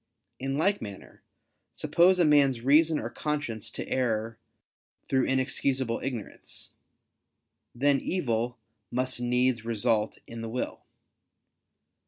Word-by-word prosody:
In 135 Hz, +1 st, -2 dB
like 195 Hz, +6 st, +2 dB
manner, 100 Hz, -2 st, -9 dB, 0.5 s
suppose 180 Hz, +2 st, +4 dB
a 175 Hz, -, +4 dB
man's 140 Hz, -5 st, +4 dB
reason 155 Hz, +5 st, +5 dB
or 115 Hz, -, -3 dB
conscience 145 Hz, -7 st, -3 dB
to -, -, -6 dB
err 115 Hz, -3 st, -1 dB, 0.7 s
through 130 Hz, -1 st, +2 dB
inexcusable 130 Hz, -2 st, 0 dB
ignorance, 125 Hz, -6 st, -6 dB, 1.0 s
then 140 Hz, +2 st, +3 dB
evil 120 Hz, -8 st, -1 dB, 0.3 s
must 130 Hz, 0 st, -1 dB
needs 125 Hz, -1 st, +1 dB
result 115 Hz, -1 st, 0 dB
in 115 Hz, 0 st, -8 dB
the 115 Hz, -, -4 dB
will. 125 Hz, +3 st, -3 dB
130 Hz, 110 wpm, -28 LUFS, 115-140 Hz, 1.0 s, reason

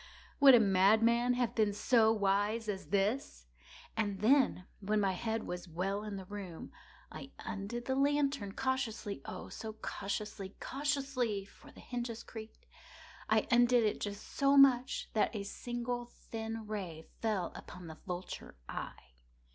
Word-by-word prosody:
Ha!—would 275 Hz, -3 st, +10 dB
a -, -, +7 dB
madman 220 Hz, +5 st, +4 dB
have 245 Hz, -2 st, 0 dB
been 215 Hz, -3 st, +2 dB
so 220 Hz, +1 st, +4 dB
wise 210 Hz, +2 st, +1 dB
as 195 Hz, -2 st, -3 dB
this? 200 Hz, -, 0 dB, 0.5 s
And 205 Hz, -3 st, -1 dB
then, 245 Hz, -5 st, +4 dB
when 210 Hz, +1 st, +1 dB
my 195 Hz, -2 st, +2 dB
head 220 Hz, +4 st, -2 dB
was 180 Hz, +1 st, -5 dB
well 195 Hz, +5 st, -2 dB
in 210 Hz, -1 st, -5 dB
the 190 Hz, -1 st, -6 dB
room, 190 Hz, -4 st, -7 dB, 0.4 s
I 270 Hz, -, -8 dB
undid 225 Hz, +3 st, -5 dB
the 265 Hz, -, 0 dB
lantern 280 Hz, -6 st, +1 dB
cautiously—oh, 235 Hz, -, -3 dB
so 220 Hz, -1 st, -6 dB
cautiously—cautiously 220 Hz, +3 st, -3 dB
(for -, -, -17 dB
the -, -, -14 dB
hinges 240 Hz, -2 st, -4 dB
creaked)—I 220 Hz, -1 st, -5 dB
undid 240 Hz, 0 st, +5 dB
it 210 Hz, -, 0 dB
just 205 Hz, 0 st, -5 dB
so 275 Hz, 0 st, +3 dB
much 260 Hz, -2 st, +5 dB
that 220 Hz, +1 st, +1 dB
a 205 Hz, -, -2 dB
single 240 Hz, +3 st, -4 dB
thin 225 Hz, -1 st, -6 dB
ray 185 Hz, -7 st, -5 dB, 0.2 s
fell 210 Hz, -6 st, 0 dB
upon 180 Hz, -1 st, -10 dB
the 160 Hz, -1 st, -9 dB
vulture 180 Hz, 0 st, -6 dB
eye. -, -, -7 dB
220 Hz, 140 wpm, -33 LUFS, 200-245 Hz, 0.5 s, Ha!—would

